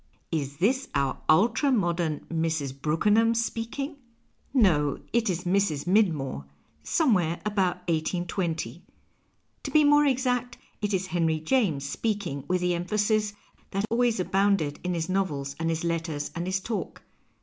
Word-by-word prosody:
Fs 140 -3 -2
this 255 +9 +1
our 140 -1 0
ultra 225 - +4
modern 170 - 0
Mrs. 160 -4 -1
Brookenham 210 +9 +3
speaking? 230 +6 -3 0.5
No, 165 - +3 0.2
it 230 -2 +2
is 180 -1 -2
Mrs. 180 -5 +1
Midmorc, 160 - +1 0.4
somewhere 180 - +2
about 185 -4 0
1820. 170 +1 -2 0.8
To - - -5
be 305 -1 +5
more 290 0 +5
exact, 250 -2 0 0.2
it 205 -1 -1
is 190 -1 0
Henry 165 -3 0
.Tames 160 - +1
speaking 195 -7 -2
with 180 0 +1
the 180 0 +1
emphasis 210 +4 0 0.4
that 195 +2 -1
always 235 -2 +2
abounded 190 -5 +1
in 180 0 -1
his 165 -1 -2
novels 150 -8 -1
and 165 0 0
his 165 0 -1
letters 165 -3 -2
and 170 +1 -4
his 190 +1 0
talk. 220 +2 -4
180 Hz, 140 wpm, -27 LUFS, 160-220 Hz, 0.8 s, be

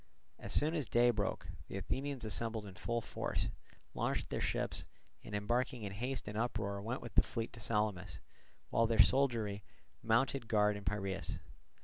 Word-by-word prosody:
As - - -7
soon 155 +2 +3
as 150 -7 -1
day 120 +1 +6
broke, 100 -6 -1 0.2
the - - -4
Athenians 135 +4 -2
assembled 110 0 -1
in 95 - -8
full 120 +4 -1
force, 110 - -2 0.4
launched - - -1
their - - -1
ships, - - 0 0.4
and 105 - -5
embarking 120 +3 0
in 100 - -3
haste 125 +6 -3
and 105 - -4
uproar 105 -3 -1
went 120 +5 -3
with 120 - -7
the - - +7
fleet 115 -2 -4
to 120 - -10
Salamis, 105 -4 -1 0.5
while 115 - +4
their 115 0 +1
soldiery 110 -5 +2 0.4
mounted 120 +2 +2
guard 105 -1 +4
in 100 -1 -7
Piraeus. 95 0 -1
110 Hz, 165 wpm, -36 LUFS, 105-120 Hz, 0.5 s, the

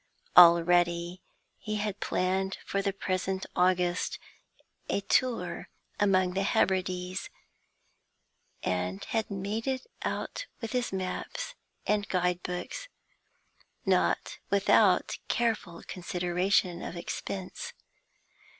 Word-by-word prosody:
Already 175 0 +6 0.4
he 215 -1 -3
had 210 -1 -2
planned 190 +1 0
for 195 - 0
the 200 0 0
present 190 0 -2
August 180 -1 +2 0.7
a 200 - +1
tour 245 +4 0 0.3
among 185 -3 +3
the 195 - 0
Hebrides, 185 -1 0 1.3
and 90 +1 -1
had 220 -1 -1
made 200 +4 -3
it 260 -1 -1 0.2
out - - -3
with 225 -2 -5
his 250 -1 0
maps 190 - -4 0.3
and 210 -1 +1
guidebooks, 180 - -1 1.0
not - - +1
without 200 -1 +4
careful 215 -8 -1
consideration 180 0 0
of - - -5
expense. 195 - -5
185 Hz, 95 wpm, -29 LUFS, 180-205 Hz, 1.3 s, Already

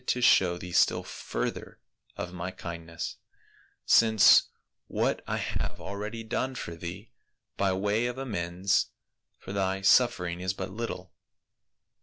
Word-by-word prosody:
to 125 - +1
show 90 -7 +5
thee 90 0 -8
still - - +3
further - - -5 0.4
of 90 - -5
my 90 0 -4
kindness, 85 -2 -6 0.7
since 110 -2 +6 0.4
what - - 0
I - - -1
have - - -3
already 105 +4 -5
done 130 +3 -2
for 85 -8 -5
thee 85 +1 -8 0.4
by 100 -1 +1
way 105 +5 +1
of 125 +1 -4
amends 100 -6 0 0.5
for 95 - -8
thy 95 -1 0
suffering 95 -5 +3
is 90 0 -1
but 95 0 -5
little. 115 +4 -5
95 Hz, 130 wpm, -28 LUFS, 90-110 Hz, 0.7 s, since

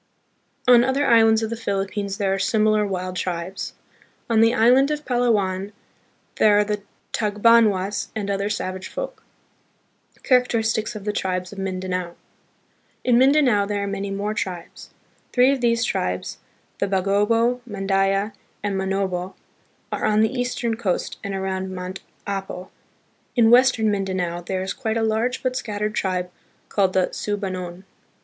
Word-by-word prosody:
On 240 -1 +7
other 265 +3 +1
islands 225 -1 +5
of 220 - -3
the - - -1
Philippines 200 -2 -3
there 195 -2 +1
are 195 - -1
similar 215 -1 +2
wild 185 -1 -3
tribes. 180 +1 -4 0.6
On 220 -1 +4
the 225 0 +5
island 250 +4 +4
of 300 0 -3
Palawan 205 -6 0 0.6
there 210 -1 +5
are 210 - +5
the 210 0 -3 0.3
Tag 210 -2 -2
banwas 210 -4 +4
and 210 -2 -3
other 200 0 -1
savage 185 -3 -3
folk. - - -6 1.0
Characteristics 230 -3 +1
of 210 - -7
the 210 - -1
Tribes 185 -1 -2
of 200 - -9
Mindanao. 185 -2 -3 0.9
In 245 -1 +4
Mindanao, 260 -7 +4
there 205 -1 -1
are - - -2
many 200 0 -3
more 200 +2 -2
tribes. 180 -5 -5 0.4
Three 250 +2 +5
of 275 -2 -1
these 230 -1 +2
tribes, 90 - -2 0.4
the - - +1
Bagobo, 210 +6 +2
Mandaya, 195 +1 0 0.3
and 205 -1 -1
Manobo, 190 -1 -2 0.6
are - - -2
on 215 0 +3
the 220 +3 +2
east 245 -1 -2
ern 230 -1 0
coast 200 -6 -2
and 200 -1 -3
around 190 0 -3
Mount 185 +1 -6 0.3
Apo. 195 -2 -5 0.6
In 230 -2 +5
Western 240 -3 +5
Mindanao, 185 -3 -2
there 185 +1 -3
is 190 - -3
quite 225 -4 -2
a 225 - 0
large 225 +3 0
but 255 -1 0
scattered 210 -3 -2
tribe 180 -3 -1 0.4
called 190 -2 +1
the 185 -1 +1
Sub 205 0 -3
anon. 185 -1 -5
205 Hz, 155 wpm, -23 LUFS, 190-230 Hz, 1.0 s, On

